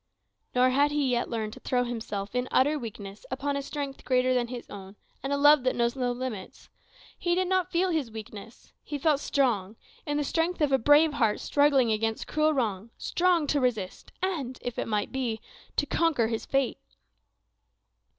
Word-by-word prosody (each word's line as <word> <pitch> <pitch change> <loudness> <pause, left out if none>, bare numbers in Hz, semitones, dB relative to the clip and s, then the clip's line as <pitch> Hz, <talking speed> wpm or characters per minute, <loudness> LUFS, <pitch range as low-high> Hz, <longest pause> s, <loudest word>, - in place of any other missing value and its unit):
Nor 255 +1 +4
had 285 +3 +3
he 290 -3 0
yet 240 -1 0
learned 220 -2 -3
to - - -11
throw 250 -1 0
himself, 220 -4 -4
in 250 0 -1
utter 295 +3 +3
weakness, 205 -4 -8
upon 280 +2 -2
a 280 - -1
strength 280 -1 -5
greater 255 0 +2
than 245 -1 +1
his 240 0 -7
own, 195 0 -10 0.3
and 270 - -3
a 280 - +2
love 290 0 +6
that 255 - +1
knows 235 +1 +1
no 250 -2 0
limits. 245 -6 -6 0.5
He 345 -1 +1
did 370 0 +1
not 370 -1 +1
feel 365 +1 +1
his 305 -7 -1
weakness: 220 0 -10
he 290 - -5
felt 290 0 +2
strong, 225 -9 0 0.3
in 295 0 0
the 295 - +1
strength 330 +5 0
of 295 -3 +2
a 270 - +4
brave 295 +5 +5
heart 225 -7 +1
struggling 280 -5 +3
against 220 +1 -1
cruel 310 0 +2
wrong; 225 -7 -1
strong 350 -3 +1
to 290 0 +1
resist, 220 -7 -2
and, 285 -10 -2
if 245 -1 -4
it - - -2
might 210 -2 -1
be, 245 -4 -2 0.4
to - - +2
conquer 295 -10 +1
his 225 -1 -3
fate. 270 -2 0
255 Hz, 190 wpm, -28 LUFS, 230-290 Hz, 0.5 s, love